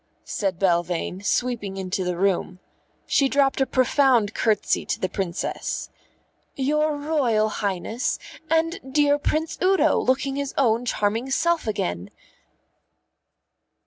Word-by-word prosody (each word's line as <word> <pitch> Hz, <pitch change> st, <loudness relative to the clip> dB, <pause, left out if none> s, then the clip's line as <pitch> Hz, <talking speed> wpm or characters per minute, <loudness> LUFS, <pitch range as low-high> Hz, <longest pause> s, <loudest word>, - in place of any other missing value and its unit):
said 195 Hz, -4 st, -2 dB
Belvane, 175 Hz, 0 st, 0 dB
sweeping 215 Hz, -4 st, -1 dB
into 185 Hz, 0 st, -2 dB
the 180 Hz, -1 st, -2 dB
room. 185 Hz, -1 st, 0 dB, 0.5 s
She 275 Hz, -1 st, +2 dB
dropped 275 Hz, 0 st, +2 dB
a 265 Hz, -, +3 dB
profound 255 Hz, -4 st, +3 dB
curtsey 215 Hz, -3 st, +1 dB
to -, -, -3 dB
the 185 Hz, -, 0 dB
Princess. 185 Hz, -1 st, -3 dB, 0.6 s
"Your 300 Hz, +2 st, +1 dB
Royal 265 Hz, -8 st, +1 dB
Highness! 210 Hz, +4 st, -2 dB, 0.3 s
And 325 Hz, +1 st, +1 dB, 0.2 s
dear 290 Hz, -1 st, +4 dB
Prince 315 Hz, +2 st, -1 dB
Udo, 375 Hz, -3 st, +3 dB
looking 270 Hz, +2 st, 0 dB
his 280 Hz, -1 st, -3 dB
own 235 Hz, -2 st, +2 dB
charming 225 Hz, +3 st, -1 dB
self 330 Hz, +1 st, +1 dB
again!" 90 Hz, -, -2 dB
240 Hz, 115 wpm, -24 LUFS, 195-285 Hz, 0.6 s, dear